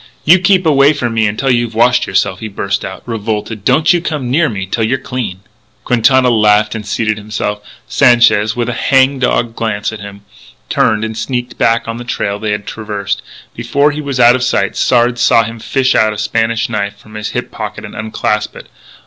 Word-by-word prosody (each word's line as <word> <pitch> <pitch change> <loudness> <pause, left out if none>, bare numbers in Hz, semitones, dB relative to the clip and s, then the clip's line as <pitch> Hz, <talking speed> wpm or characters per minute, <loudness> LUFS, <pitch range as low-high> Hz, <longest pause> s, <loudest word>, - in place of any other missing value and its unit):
"You 175 +5 +6
keep 185 0 +2
away 145 -1 +4
from 120 -5 -3
me 110 -1 +2
until 120 +6 -1
you've 120 -2 0
washed 125 +2 +3
yourself," 95 0 0
he 110 - -5
burst 100 -1 -3
out, 95 - -7
revolted. 110 -2 -4
"Don't 155 - +3
you 175 - +1
come 150 -8 -3
near 155 +2 +2
me 100 -4 -4
till 110 +4 -2
you're 125 +5 +1
clean!" 125 -8 -5 0.4
Quintana 125 +1 +3
laughed 105 -1 +3
and 110 -1 -5
seated 110 +1 -1
himself. 105 0 -4 0.3
Sanchez, 120 -4 +3
with 120 -1 -2
a 120 - -2
hang 135 +1 +2
dog 120 -2 0
glance 110 -2 -2
at 110 - -8
him, 100 0 -10 0.5
turned 110 0 +1
and 110 0 -5
sneaked 125 +2 -4
back 115 0 +1
on 115 0 -4
the 120 - -7
trail 100 -4 -3
they 110 - -3
had 105 0 -2
traversed. 105 -2 -4 0.3
Before 140 +5 +1
he 150 +1 -5
was 140 -3 -4
out 120 0 +7
of 130 - -1
sight 100 -6 0
Sard 120 -1 +2
saw 115 -1 +4
him 115 +1 -7
fish 130 +3 0
out 110 -1 +2
a - - -8
Spanish 115 +2 0
knife 100 -3 -3
from 110 +1 -17
his 105 0 -4
hip - - -4
pocket - - -6
and - - -10
unclasp 105 0 -2
it. - - -12
115 Hz, 205 wpm, -14 LUFS, 105-125 Hz, 0.5 s, out